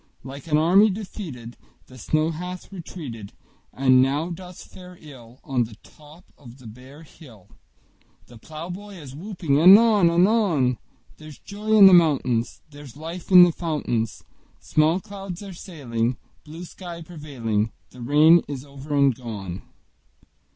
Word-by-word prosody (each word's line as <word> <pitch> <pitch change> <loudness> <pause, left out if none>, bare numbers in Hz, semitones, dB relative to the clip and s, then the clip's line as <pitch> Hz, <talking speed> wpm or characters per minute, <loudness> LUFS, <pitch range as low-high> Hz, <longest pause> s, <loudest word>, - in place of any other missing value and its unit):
Like 135 +4 -10
an 150 -1 +2
army 185 +7 +4
defeated 185 - -8 0.3
The 130 0 -15
snow 155 +6 0
hath 180 +4 -8
retreated, 145 - -9 0.4
And 130 -1 +3
now 145 +6 -1
doth 180 +1 -10
fare 180 -1 -14
ill 130 -5 -15
On 130 -5 -1
the 110 -1 -13
top 155 +4 -18
of 125 -3 -14
the 130 - -18
bare 130 +7 -13
hill; 115 - -17 0.8
The 120 -2 -16
plowboy 175 - -9
is 145 -7 -11
whooping 170 -5 -2
anon 200 +1 +6
anon: 170 - +2 0.4
There's 155 -2 -13
joy 215 +2 -2
in 200 - +9
the 190 - +8
mountains; 135 -9 +2
There's 145 -2 -13
life 165 +3 -8
in 180 -2 +9
the 175 - +4
fountains; 150 - -3 0.4
Small 155 +4 +1
clouds 195 -2 -9
are 195 -2 -9
sailing, 125 - -4 0.3
Blue 160 +4 -9
sky 170 -1 -10
prevailing; 125 -10 -4 0.2
The 125 - -13
rain 155 +7 +5
is 140 -2 -7
over 140 +1 -7
and 140 -2 +3
gone! 105 -7 -8
155 Hz, 145 wpm, -23 LUFS, 130-180 Hz, 0.8 s, in